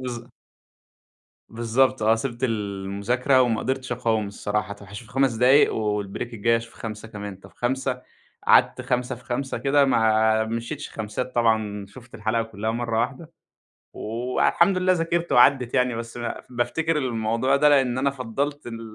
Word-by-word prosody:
بالض 120 -1 -6 1.2
بالضبط 120 +3 +1
آه، 110 +1 +4
سِبت 120 +1 -4
المذاكرة 105 +4 0
وما 115 -3 +1
قدرتش 130 -1 -2
أقاوم 115 -3 0
الصراحة. 105 +1 -3
طب، 100 0 -14
هاشوف 105 +4 -10
5 135 -1 +2
دقايق 125 +5 +4
والبريك 105 +2 -3
الجاي 115 +2 +2
أشوف 115 0 -7
5 110 0 -7
كمان، 105 -2 -7
طب، 95 - -16
5 125 0 -2 0.4
قعدت - - +5
5 125 +1 -1
في 125 0 -16
5 130 +3 -3
كده، 140 +1 +3
ما 110 -3 +3
مشيتش 115 +6 -5
خمسات 115 +4 -5
طبعًا، 110 -4 +1
شُفت 120 +4 -15
الحلقة 110 +2 0
كلها 110 -1 -4
مرة 115 -1 -1
واحدة، 135 +7 -4 0.6
والحمد 125 - +1
لله 185 0 +3
ذاكرت 170 0 -1
وعدت 125 0 +4
يعني 125 -2 +2
بس 115 +1 -6
ب 120 -1 -3 0.2
بافتكر 125 +7 -1
الموضوع 120 0 0
ده 150 +1 +5
لإن 135 -4 +3
أنا 135 +2 +2
فضلت 140 +3 -4
ال 115 -1 -6
120 Hz, 150 wpm, -24 LUFS, 110-130 Hz, 1.2 s, قعدت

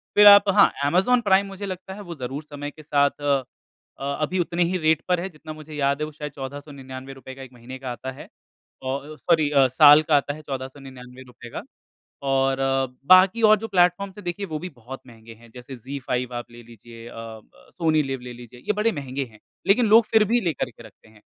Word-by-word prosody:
फिर 205 0 +8
आप 200 0 +8
हाँ, 205 +1 +5
अमेज़न 190 +11 +3
प्राइम 200 -2 +3
मुझे 195 +1 -7
लगता 185 0 -7
है 205 - -9
वो 175 -4 -8
ज़रूर 135 +2 -6
समय 145 -1 -7
के 155 - -15
साथ 145 -1 +1
अ 140 -2 +1 0.6
अ, 140 +1 -3
अभी 180 +5 -1
उतने 175 0 0
ही 180 +2 -1
रेट 160 -2 +2
पर 180 -1 +1
है 180 - -3
जितना 155 -1 -10
मुझे 155 0 -12
याद 140 0 0
है 150 - 0
वो 155 - -9
शायद 150 -1 -7
1499 135 -1 -9
रुपए 130 0 -11
का 135 - -12
1 130 -2 -11
महीने 125 +2 -10
का 130 -2 -5
आता 130 +2 -6
है 130 - -12 0.6
औ 130 - -2
औ 150 +2 -11
सॉरी 155 0 +2
अ, 135 -2 +5
साल 145 +3 +7
का 155 -1 +2
आता 145 0 -2
है 155 - -11
1499 130 -2 -9
रुपए 120 -1 -13
का। - - -3 0.7
और 135 0 +1 0.5
बाकी 185 +5 +6
और 215 0 +6
जो 225 - -5
प्लेटफॉर्म्स 185 +1 +1
हैं 205 - -10
देखिए, 180 +3 -3
वो 155 -4 -5
भी 180 - -6
बहुत 130 -2 -11
महँगे 115 -1 -14
हैं 115 +1 -19
जैसे 125 +2 -9
ज़ी 135 +4 -7
फाइव 125 0 -2
आप 120 0 -7
ले 120 0 -13
लीजिए, 115 0 -13
अ, - - -11
ब 115 -1 -12
सोनी 160 -3 +1
लिव 135 -1 -4
ले 125 0 -8
लीजिए 120 0 -13
ये 210 - +2
बड़े 210 +3 +1
महँगे 140 -5 -4
हैं, 110 -3 -19 0.3
लेकिन 225 +4 +4
लोग 220 +1 +6
फिर 220 -1 +5
भी 240 - +4
लेकर 160 -6 -1
के - - -16
रखते - - -18
हैं। 110 -1 -21
145 Hz, 230 wpm, -23 LUFS, 130-180 Hz, 0.7 s, फिर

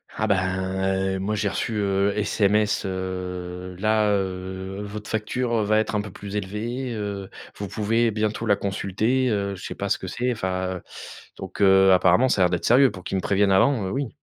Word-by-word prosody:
Ah 110 - 0
ben, 100 -2 +3 0.8
heu, - - -3
moi 105 +3 -1
j'ai 100 0 0
reçu, 115 - -2
heu, 100 -1 +1
SMS, 105 0 +2
heu, 90 -1 -5
là, 110 +1 +2
heu, 95 0 -3
votre 105 +1 -7
facture 115 +1 -1
va 110 +1 +2
être 110 0 0
un 105 - +1
peu 105 - -7
plus 100 +1 -8
élevée, 115 +6 -3
heu, 100 -2 -4 0.3
vous 100 - -4
pouvez 115 +3 +1
bientôt 110 +1 -2
la 100 - +5
consulter, 110 +6 0
heu 100 -2 -1
je 90 - -11
sais - - -5
pas - - -3
ce - - 0
que - - -6
c'est, 125 +1 -1
enfin 95 -4 -2 0.6
donc - - -7
heu, 95 -1 +6
apparemment 90 +7 +4
ça 100 - +1
a - - +6
l'air - - +2
d'être 90 -1 -2
sérieux 130 +2 +6
pour 90 - -10
qu'ils 95 - -2
me - - -1
préviennent 100 0 +2
avant, 105 +2 +3
heu, - - -3
oui. 135 -1 -2
100 Hz, 205 wpm, -24 LUFS, 95-110 Hz, 0.8 s, heu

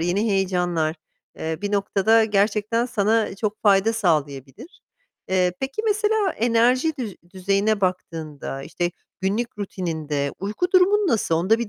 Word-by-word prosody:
yeni 195 +6 0
heyecanlar, 180 -4 0 0.4
eee, 160 0 -3
bir 205 0 -2
noktada 205 +2 +3
gerçekten 215 +3 +1
sana 220 -3 +1
çok 210 +1 -3
fayda 200 +1 +4
sağlayabilir. 155 - -2 0.5
Eee, 180 -1 +2
peki 270 +11 -3
mesela 425 -1 +2
enerji 245 +6 +2
düz 220 -6 -5 0.2
düzeyine 200 +3 +1
baktığında, 160 -7 -3
işte 175 +4 -2 0.3
günlük 210 +3 -2
rutininde 160 -7 -3
uyku 215 - -2
durumun 390 +2 +4
nasıl? 220 - +1
Onda 190 +8 +2
bir 235 -3 -3
200 Hz, 130 wpm, -23 LUFS, 175-230 Hz, 0.5 s, fayda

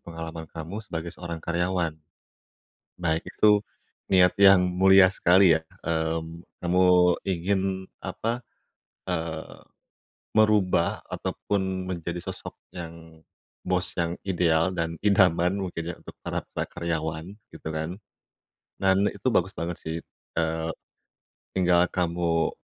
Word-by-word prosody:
pengalaman 80 -1 -7
kamu 85 +6 -6
sebagai 85 -3 -5
seorang 85 -2 -6
karyawan. 85 -1 -1 1.1
Baik, 80 -2 0
itu 105 -1 +4 0.5
niat 90 -2 +6
yang 95 -2 +8
mulia 95 +1 +6
sekali 90 -2 +5
ya, - - -11 0.2
mmm, 80 +1 -2 0.2
kamu 90 +1 +3 0.4
ingin 95 +1 0 0.4
apa, 115 +2 -3 0.7
eee, 80 -2 -4 0.7
merubah 105 -5 +3 0.2
ataupun 95 -2 -2
menjadi 85 -1 -4
sosok - - -7 0.2
yang 80 -2 -10 0.4
bos 90 0 -1
yang 85 +1 -1
ideal 85 -1 +2
dan 85 -1 -2
idaman 95 -1 +3
mungkin 85 -2 -4
ya - - -11
untuk - - -12
para-para - - -3
karyawan 80 +3 -4 0.2
gitu - - -9
kan. 80 +5 -4 0.8
Dan 95 +1 +4
itu - - -4
bagus 95 -5 +2
banget 85 +1 -3
sih, 80 +1 -4 0.4
eee, 80 0 -1 0.9
tinggal 90 -1 +4
kamu 85 -2 0
85 Hz, 110 wpm, -26 LUFS, 80-95 Hz, 1.1 s, yang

